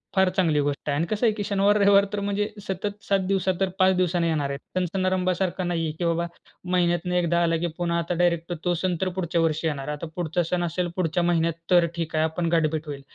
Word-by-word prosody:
फार 190 -1 +4
चांगली 160 -5 +3
गोष्ट 145 +1 -2
आहे. 145 - +1
अन् 165 - +1
कसं 215 +3 +1
आहे, 220 - +4
की 205 - -3
शनिवार, 200 0 +2
रविवार 200 -1 +5
तर 205 - -1
म्हणजे 205 +1 -1 0.2
सतत 200 +2 -4
7 195 -1 +3
दिवस, 190 -1 0
तर 195 - +1
5 190 0 +5
दिवसांनी 175 -1 +1
येणार 150 -4 0
आहेत. 140 +1 -4 0.2
सण-समारंभासारखं 185 0 0
नाही 170 -2 -1
आहे, 155 - -1
की 175 - 0
बाबा, 170 0 0 0.4
महिन्यातनं 175 0 +1
एकदा 170 -1 +2
आला, 165 -1 +2
की 170 +2 -1
पुन्हा 170 -1 0
आता 170 +1 -2
डायरेक्ट 170 0 +1
तो 175 - +2
सण 180 +1 -1
तर 190 - +1
पुढच्या 170 -2 0
वर्षी 160 0 0
येणार. 140 -3 -3
आता 150 +2 -4
पुढचा 175 0 -1
सण 175 +2 -1
असेल 175 +1 -1
पुढच्या 175 -1 0
महिन्यात 170 -1 +2 0.2
तर 175 -1 +6
ठीक 165 -2 -3
आहे 155 - +3
आपण 165 +1 -1
गाठभेट 160 -1 +1
होईल, 140 -1 -6
175 Hz, 230 wpm, -25 LUFS, 165-185 Hz, 0.4 s, तर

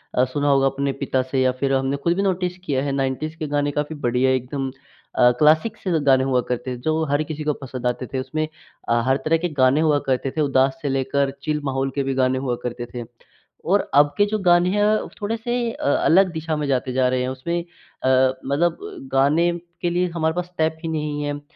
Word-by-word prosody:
अ, 125 - +4
सुना 145 +3 -2
होगा 135 -1 +4
अपने 140 +1 -1
पिता 130 -1 +1
से 135 - +1
या 130 0 +3
फिर 135 0 +1
हमने 135 +1 0
ख़ुद 170 +5 0
भी 195 - 0
नोटिस 180 -2 -1
किया 135 -4 0
है 140 - -1
90s 135 +4 -2
के 155 - -4
गाने 145 0 0
काफ़ी 150 +2 -3
बढ़िया 125 +2 +2
एकदम 130 +1 -2 0.5
अ, 125 0 +6
क्लासिक 160 +9 +3
से 175 -5 +1
गाने 130 -1 +5
हुआ 130 -2 +2
करते 125 +1 -2
थे - - -9
जो 155 +3 0
हर 145 +2 +2
किसी 155 0 -6
को 150 0 +1
पसंद 125 -1 -4
आते 125 +1 -2
थे। 130 - 0
उसमें 155 +4 -2 0.4
अ, 120 0 +3
हर 130 +1 +3
तरह 165 +1 +3
के 175 +1 -2
गाने 130 +4 +4
हुआ 150 -2 +3
करते 130 +1 0
थे 155 - -2
उदास 135 -2 +2
से 145 - -2
लेकर 135 +1 0
चिल 150 0 -1
माहौल 135 0 -1
के 140 - 0
भी 135 0 -1
गाने 130 0 +1
हुआ 130 -2 -1
करते 120 0 -4
थे। 120 -1 -4 0.7
और - - +5
अब 145 +1 +5
के 205 - +6
जो 215 +1 -1
गाने 175 -2 +4
हैं 205 +2 +1
अ, 215 +1 +2
थोड़े-से 230 +3 -1
अ, - - -7
अलग 180 +6 +4
दिशा 160 -1 -3
में 150 -1 -2
जाते 130 -1 0
जा 130 0 +2
रहे 130 0 0
हैं 125 - -2
उसमें 170 +7 -2
अ, 170 -6 -8 0.4
मतलब 150 +6 +1
ब 385 -10 -9
गाने 150 +6 +3 0.3
के 175 - +1
लिए 180 +1 +1
हमारे 160 -1 0
पास 180 0 -1
स्टेप 160 -3 -1
ही 165 - -3
नहीं 150 -2 -2
हैं 145 0 -3
145 Hz, 230 wpm, -22 LUFS, 130-165 Hz, 0.7 s, अ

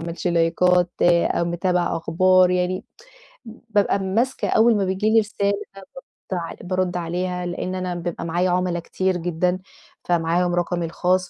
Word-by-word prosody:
معملش 170 +2 -5
لايكات 175 +1 +2
أو 170 0 +3
متابعة 175 0 0
أخبار 185 +2 +3
يعني 180 0 -1 0.6
بابقي 220 -3 -1
ماسكة 225 +8 -1
أول 225 +1 +4
ما 195 - +1
بييجي 190 +3 0
لي 225 - +5
رسالة 205 -2 -1 0.2
بارُد 195 -1 -11 0.5
ع 170 -2 -3
بارُد 185 -1 -1
عليها، 180 +1 -3
لأن 180 +1 -4
أنا 185 -1 -3
بيبقي 175 -1 -4
معايا 175 +2 0
عُملا 180 -1 0
كتير 185 +2 -1
جدً، 175 +1 0
ا - - -8 0.5
فمعاهم 175 +1 +1
رقمي 175 0 -1
الخاص 180 +2 0
180 Hz, 150 wpm, -22 LUFS, 175-185 Hz, 0.6 s, لي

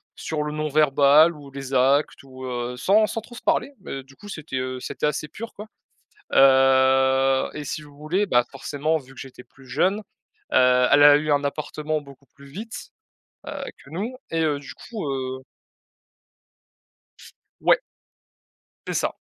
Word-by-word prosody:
sur 155 -2 -3
le 150 - -4
non 155 0 -2
verbal 150 +2 +5
ou 145 -2 -12
les 135 0 -8
actes 135 +3 +2
ou, 130 -1 -10
heu, 125 0 -4
sans 200 - +3
sans 225 - -4
trop 240 - -15
se 240 - -10
parler. 280 - +1
Mais 135 -7 -7
du 135 +1 -19
coup, 205 - -13
c'était, 155 -7 -6
heu, 130 0 -3
c'était 140 - -2
assez 150 +1 -2
pur 230 +8 -8
quoi. 210 - -8 0.7
Heu 135 0 +4
et 150 -1 -6
si 150 - -4
vous 145 -1 -15
voulez, 170 +7 0
bah, 120 -10 +3
forcément, 145 +3 -2
vu 135 -3 -12
que - - -13
j'étais 130 -1 -10
plus 135 0 -20
jeune, 190 +9 +1 0.6
heu, 125 0 +5
elle 145 0 +6
a 145 0 +9
eu 155 +1 -3
un 145 0 +2
appartement 150 +1 -3
beaucoup 140 -1 -16
plus 140 -1 -16
vite, 210 +11 -8 0.6
heu, - - -5 0.3
que 140 - -16
nous 210 +10 -4
et 165 0 0
heu, 150 -2 0
du 140 - -10
coup, 220 -6 -7
heu 130 -1 -4 2.2
Ouais. - - +5 1.1
C'est - - -2
ça - - -1
140 Hz, 170 wpm, -23 LUFS, 130-155 Hz, 2.2 s, a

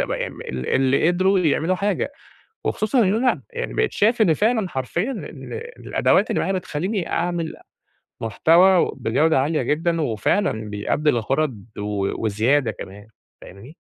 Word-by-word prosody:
ال 65 0 -4
اللي 135 +3 +3
قدروا 190 +2 +2
يعملوا 165 +1 +1
حاجة. 205 +8 -1 0.5
وخصوصًا 215 +4 0
إنّه 200 +2 +2
أنا 250 +1 +1
يعني 480 0 -4
بقيت 445 - +1
شايف 225 +3 +2
إن 180 -7 +5
فعلًا 215 +1 +1
حرفيًا 170 - -2
إن - - -8 0.3
الأدوات - - +2
اللي - - 0
معايا 190 - -1
بتخليني 185 +2 -3
أعمل 170 -1 -1 0.7
محتوى 170 - +4
بجودة 135 +4 +2
عالية 150 +3 0
جدًا، 165 +2 0
وفعلًا 150 - +1 0.2
بيأدي 105 +9 0
الغرض 125 -2 0 0.2
و 105 0 -2
وزيادة 115 +4 +2
كمان. 100 +1 -10 0.3
فاهمني؟ 115 - -13
160 Hz, 135 wpm, -22 LUFS, 120-190 Hz, 0.7 s, إن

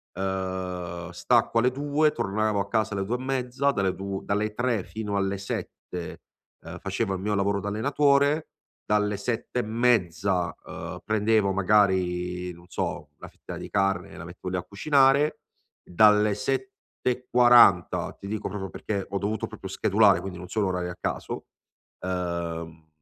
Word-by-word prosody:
uhm, 95 -2 -3
stacco 115 +5 +2
alle 125 +2 +3
2, 145 +3 +1
tornavo 105 -5 0
a 100 - -1
casa 110 0 0
alle 95 0 -1
2 120 +4 -1
e - - -9
mezza, 135 +1 0
dalle 95 -6 0
2 95 0 -4
dalle 105 +1 -1
3 120 -4 0
fino 105 -2 -5
alle 100 0 0
7, 90 -2 -6 0.4
uhm, - - -8
facevo 100 +1 -2
il - - -5
mio 105 +1 -1
lavoro 100 0 +1
d'allenatore, 140 - +2 0.4
dalle 105 -1 +1
7 120 +3 -2
e - - +3
mezza, 100 -7 +1
uhm, - - -7
prendevo 110 -2 +2
magari 90 -3 +1
non 85 +1 -17
so, 90 - -4
una - - -10
fetta - - -10
di - - -7
carne 95 -2 0
e - - -11
la 80 - -8
mettevo 90 +1 -7
lì 90 - -1
a 90 - -3
cucinare, 140 +6 +3 0.4
dalle 105 +2 +4
7 130 +3 -1 0.4
e 125 0 0
40, 120 -8 +5
ti 100 - -10
dico 110 0 -3
proprio 95 -1 -5
perché 100 -3 -4
ho 100 - -2
dovuto 105 +2 -2
proprio 105 -3 -9
schedulare, 100 +1 +4
quindi 95 -2 -6
non 90 0 -8
sono 105 -3 0
orari 90 -1 -2
a 90 - -6
caso, - - -4 0.6
uhm, 85 -3 -4
100 Hz, 160 wpm, -26 LUFS, 95-115 Hz, 0.6 s, 40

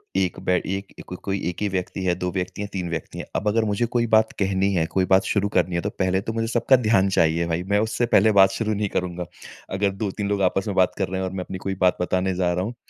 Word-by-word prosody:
एक 95 -2 0
बै 90 - +4 0.2
एक 95 0 -4 0.2
क - - -3
कोई 100 -1 -2
1 90 - -7
ही 105 - +1
व्यक्ति 95 +1 -3
है, 90 -1 +2
2 90 0 -3
व्यक्ति 95 +2 -4
है, 105 - -3
3 90 -3 -3
व्यक्ति 80 -2 -5
है। - - -5
अब 105 - -1
अगर 110 +2 +2
मुझे 105 +3 0
कोई 120 -1 +2
बात 110 0 +4
कहनी 95 0 +1
है, 80 -3 +1
कोई 95 +3 0
बात 95 - +5
शुरू 100 -1 0
करनी 90 -1 +2
है 85 - 0
तो 100 - -2
पहले 95 -1 0
तो 110 - -4
मुझे 115 0 -1
सबका 120 +3 +3
ध्यान 95 -3 +4
चाहिए 85 +1 +2
भई, 85 +1 -1
मैं 100 +2 +1
उससे 110 +2 0
पहले 110 +3 +5
बात 95 0 +8
शुरू 110 +1 -1
नहीं 105 0 -1
करूँगा। 90 -1 -3 0.5
अगर 100 0 +2
2-3 100 0 -2
लोग 100 -1 0
आपस 95 +2 -3
में 100 - -2
बात 95 -1 +4
कर 95 - 0
रहे 95 +1 -3
हैं 95 - -1
और 95 - -7
मैं 90 - -3
अपनी 95 - -6
कोई 95 0 -1
बात 90 - +3
बताने 95 +1 0
जा 90 -1 +1
रहा 90 +1 -1
हूँ, 115 - -4
त - - -28
95 Hz, 285 wpm, -23 LUFS, 90-105 Hz, 0.5 s, बात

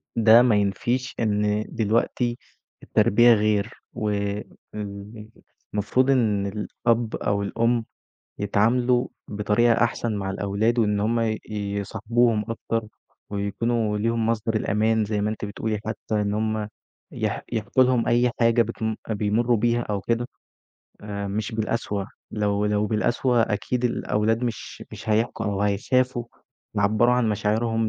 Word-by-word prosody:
ده 115 +1 +7
ما 120 -4 +4
ينفيش 120 +6 0
إن 105 -1 +1
دلوقتي 115 +2 0 0.5
التربيّة 120 +3 +5
غير، 105 0 +1 0.2
والمفروض 105 +3 -4
إن 105 -6 +2
الأب 115 +3 -1
أو 100 0 -1
الأم 115 +2 0 0.5
يتعاملوا 120 +5 +2 0.2
بطريقة 105 +3 +2
أحسن 115 -1 -1
مع 95 -1 -3
الأولاد، 100 +5 0
وإن 105 -2 +2
هُم 115 +3 +1
ي 110 -2 0
يصاحبوهم 105 +2 0
أكتر، 115 -1 -3 0.4
ويكونوا 105 +2 -1
ليهم 115 +1 0
مصدر 115 0 0
الأمان 110 +1 +1
زي 105 -1 -1
ما 105 - 0
أنتِ 110 -1 -4
بتقولي، 105 +1 -3
حتى 110 -1 -2
إن 100 0 -1
هُم 110 0 -1 0.4
يح - - -2
يحكوا 110 +4 +2
لهم 125 -2 +2
أي 120 +1 +3
حاجة 115 0 +4
بتم 110 -1 -2
بيمروا 110 +3 +1
بيها 120 +2 +1
أو 100 -4 -3
كده 120 +3 -1 0.7
آآ، 100 -1 -5
مش 105 +2 -3
بالقسوة، 110 -2 -2 0.2
لو 105 -1 0
لو 105 0 +1
بالقسوة 120 +3 +2
أكيد 120 +4 -1
الأولاد 115 -1 0
مش 115 -3 -5
مش 115 - -9
هيحكوا 110 +1 0
أو 100 -1 -1
هيخافوا 120 +5 +1 0.5
يعبّروا 110 +4 +3
عن 120 -3 +2
مشاعرهم 110 +2 0
110 Hz, 125 wpm, -24 LUFS, 105-115 Hz, 0.7 s, ده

